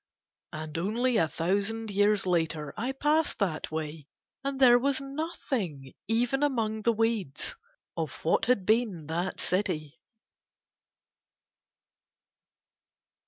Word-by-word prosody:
And 155 +1 -5
only 230 +6 +1
a 165 - +3
thousand 200 +7 -1
years 205 0 +3
later 160 -5 0
I 235 +5 -2
passed 300 +3 +1
that 180 -7 -1
way, 155 -2 -5 0.4
and 275 -1 -2
there 245 -2 +7
was 275 +1 +2
nothing, 265 - -4
even 245 +5 +1
among 225 -7 0
the 235 - +3
weeds, 225 - -1 0.4
of - - -2
what - - +3
had 240 -7 +2
been 215 -7 +1
that 170 +4 -2
city. 160 -5 -1
210 Hz, 110 wpm, -29 LUFS, 165-245 Hz, 0.4 s, there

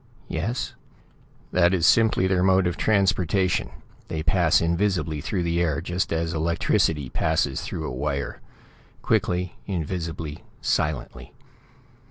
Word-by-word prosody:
"Yes." 105 +11 -2 0.8
"That 90 +1 +4
is 85 -3 +1
simply 110 -4 +4
their 95 -1 +2
mode 95 0 +4
of 90 -1 0
transportation. 95 - +1 0.4
They 80 -1 -3
pass 85 -1 +3
invisibly 85 -3 0
through 90 +4 -2
the 85 0 0
air, 80 -4 +1
just 90 +2 -2
as 80 0 -1
electricity 80 -3 +1
passes 65 +2 0
through 80 - -5
a - - -3
wire; 70 -1 -3 0.6
quickly, 90 0 0
invisibly, 80 -4 -4 0.2
silently. 75 -4 -2
85 Hz, 120 wpm, -25 LUFS, 80-95 Hz, 0.8 s, That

